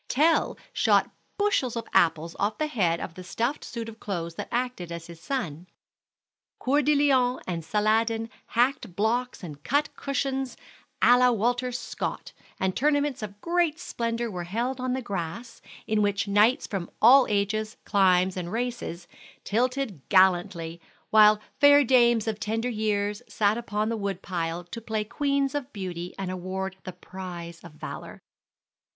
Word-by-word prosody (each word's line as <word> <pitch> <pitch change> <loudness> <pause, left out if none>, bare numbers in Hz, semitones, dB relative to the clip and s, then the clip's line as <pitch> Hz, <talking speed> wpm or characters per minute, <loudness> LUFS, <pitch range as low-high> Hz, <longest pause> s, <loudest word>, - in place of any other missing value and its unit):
Tell 315 +5 +2 0.2
shot - - +3 0.3
bushels 400 - +1
of 230 -1 -4
apples 165 0 +2
off 210 +2 0
the 310 - 0
head 180 - +1
of - - -6
the 185 - -9
stuffed 235 +10 -2
suit 230 -2 -6
of 225 0 -10
clothes 170 -4 -4
that - - -6
acted 245 -8 -2
his 170 0 -8
son, 180 - -4 0.9
Coeur 285 +3 +2
de 300 +1 +3
Leon 260 -3 +3
and 170 -3 -3
Saladin 225 +5 +1 0.3
hacked 240 -6 +1
blocks 230 +3 0
and 150 -4 -9
cut 290 +3 0
cushions 270 -1 -2 0.5
à 245 0 +7
la 250 0 +6
Walter 245 +2 0
Scott, 245 - -5 0.3
and 190 -1 0
tournaments 290 -1 +1
of 205 -1 -7
great 340 -2 +1
splendor 230 -7 -3
were 175 -2 -5
held 240 +8 -2
on 255 0 -1
the 260 0 -2
grass, 200 +4 -5 0.2
in 215 -1 +1
which 205 0 +1
knights 210 +5 +4
from 190 -4 -4
all 255 +4 +7
ages, 215 +1 -1
climes, 185 -2 +3
and 175 -1 -4
races, 230 -7 -4 0.4
tilted 245 - -1
gallantly, 175 -3 +3 0.3
while 215 -1 +7 0.2
fair 285 0 +7
dames 240 -3 +4
of 215 -1 -2
tender 225 +3 -1
years 210 -2 -1
sat 205 0 +2
upon 215 -2 -2
the 230 - -1
wood 200 -2 -3
pile 170 -2 -3
to 230 +7 -8
play 220 -1 -2
Queens 275 +4 0
of 285 -2 -4
Beauty 180 -4 -6
and 190 -2 -3
award 185 +1 -4
the 185 - -4
prize 175 -2 -8
of 170 - -12
valor. 155 - -8
215 Hz, 155 wpm, -26 LUFS, 185-250 Hz, 0.9 s, à